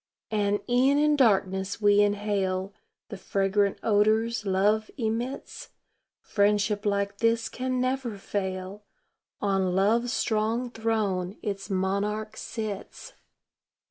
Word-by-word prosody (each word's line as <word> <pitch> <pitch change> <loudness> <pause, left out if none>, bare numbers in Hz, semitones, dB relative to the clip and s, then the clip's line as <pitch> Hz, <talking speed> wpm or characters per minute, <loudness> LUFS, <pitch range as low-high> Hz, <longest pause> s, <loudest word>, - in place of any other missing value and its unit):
And 205 -1 +1
e'en 260 +3 +3
in 300 0 +4
darkness 195 -6 +2
we 205 -1 +5
inhale 200 -2 0 0.4
The 205 - -6
fragrant 200 +1 +1
odors 215 +1 +2
love 205 +3 +2
emits; 235 +2 -4 0.5
Friendship 205 0 +1
like 200 0 -1
this 230 0 +2
can 255 0 -2
never 255 -3 -1
fail 190 0 -4 0.6
On 195 -2 +1
love's 230 +5 +2
strong 230 +2 0
throne 215 -5 -1
its 200 -2 -4
monarch 200 +3 -1
sits. 215 -3 -6
210 Hz, 105 wpm, -27 LUFS, 200-225 Hz, 0.6 s, we